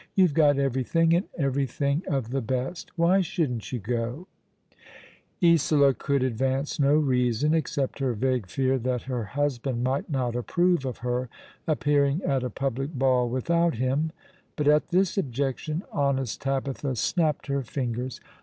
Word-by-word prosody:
You've 185 -6 +4
got 145 -2 +4
everything, 140 +5 +2
and 175 +3 +1
every 140 -2 0
thing 140 +4 -1
of 130 -5 -2
the 135 0 0
best. 130 +8 -3
Why 175 +3 +4
shouldn't 160 - -2
you 125 - -1
go? 120 - -3 0.6
" - - -19
Isola 150 -4 +5
could 140 0 0
advance 130 +4 -1
no 140 +1 +4
reason, 130 -1 +2
except 150 -4 -1
her 130 -3 0
vague 125 -2 0
fear 130 +6 0
that 125 0 -2
her 125 -4 -3
husband 130 +1 -2
might 130 +5 -1
not 125 -5 -1
approve 175 +5 +1
of 130 -3 -4
her 125 0 -1 0.4
appearing 145 +1 +2
at 135 -2 +1
a 125 - -2
public 135 +4 -3
ball 130 -2 +2
without 170 +7 +1
him; 135 +6 0 0.4
but 150 - -1
at 150 0 +4
this 185 +2 +1
objection 140 +4 -2
honest 135 -4 -1
Tabitha 135 0 -2
snapped 155 - 0
her 140 0 -1
fingers. 125 0 -4
135 Hz, 155 wpm, -26 LUFS, 125-150 Hz, 0.6 s, Isola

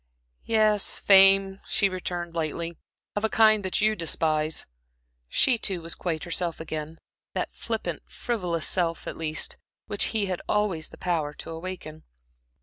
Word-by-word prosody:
"Yes, 215 -2 +4
fame," 195 0 +6
she 200 - +3
returned, 175 -2 -4
lightly 165 +1 -3 0.4
"of 205 - -1
a 220 - +2
kind 215 -2 +5
that 190 +1 0
you 215 +1 +3
despise." 155 -2 0 0.6
She, 245 - +3
too, 190 -4 -1
was 165 - -3
quite 165 -3 -3
herself 175 -1 -2
again 160 0 -5 0.4
that - - -2
flippant, - - -3
frivolous 180 -9 -2
self, 170 -3 -1
at - - -5
least, 155 -1 -1 0.3
which 205 - +1
he 220 -3 0
had 185 -2 -3
always 200 -7 0
the - - -13
power 160 -5 -1
to 165 - -9
awaken. 165 -2 -7
180 Hz, 145 wpm, -26 LUFS, 165-200 Hz, 0.6 s, fame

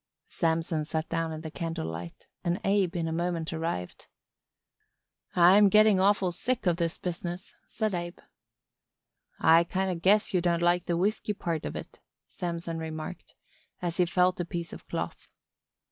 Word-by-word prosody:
Samson 165 -1 0
sat 160 +1 -3
down 165 -1 -1
in 155 0 -6
the 160 -1 -7
candlelight 85 - -5 0.2
and 175 +2 0
Abe 195 -2 +2
in 165 -2 -1
a - - -2
moment 170 -1 -2
arrived. 160 - -4 1.3
"I'm 190 +4 +7
getting 215 -1 +6
awful 195 -1 +3
sick 245 +7 -2
o' 175 - +4
this 170 -1 -1
business," 175 0 -5
said 215 -2 -2
Abe. 175 0 -4 1.2
"I 165 +1 +6
kind 190 +2 -1
o' - - -2
guess 205 +5 +3
you 180 - +3
don't 170 -1 +1
like 175 0 +3
the 170 -2 +1
whisky 210 +3 0
part 165 -5 -3
of - - -4
it," - - -8 0.3
Samson 170 -1 -4
remarked, 160 -1 -7 0.4
as 175 -2 -3
he 180 -2 +3
felt 180 +1 +2
a - - +1
piece 170 0 -5
of - - -11
cloth. - - -4
175 Hz, 160 wpm, -28 LUFS, 165-185 Hz, 1.3 s, I'm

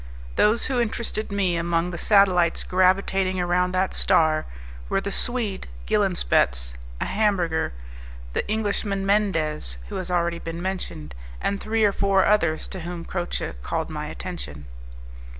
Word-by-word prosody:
Those 215 +3 +3
who 255 -2 +1
interested 220 -2 -1
me 195 -3 +1
among 170 +1 0
the 170 - -5
satellites 185 -5 +4
gravitating 185 0 +2
around 180 +1 +1
that 185 +1 +1
star 155 -4 +3 0.4
were - - +2
the 200 +1 -4
Swede 230 -4 -1 0.2
Gilenspetz, - - +2 0.3
a - - -1
Hamburger, 185 - +1 0.6
the - - 0
Englishman 205 -2 -1
Mendez, 165 - +1
who - - -4
has 185 - -4
already 170 -1 0
been 165 0 -6
mentioned, 175 - -4 0.3
and 200 0 -1
three 220 0 0
or 205 - +5
four 195 -1 +2
others 170 -7 +2
to 190 - -5
whom 175 0 -6
Croce 175 -1 -3
called - - -3
my - - -4
attention. 70 0 -7
185 Hz, 140 wpm, -24 LUFS, 170-200 Hz, 0.6 s, or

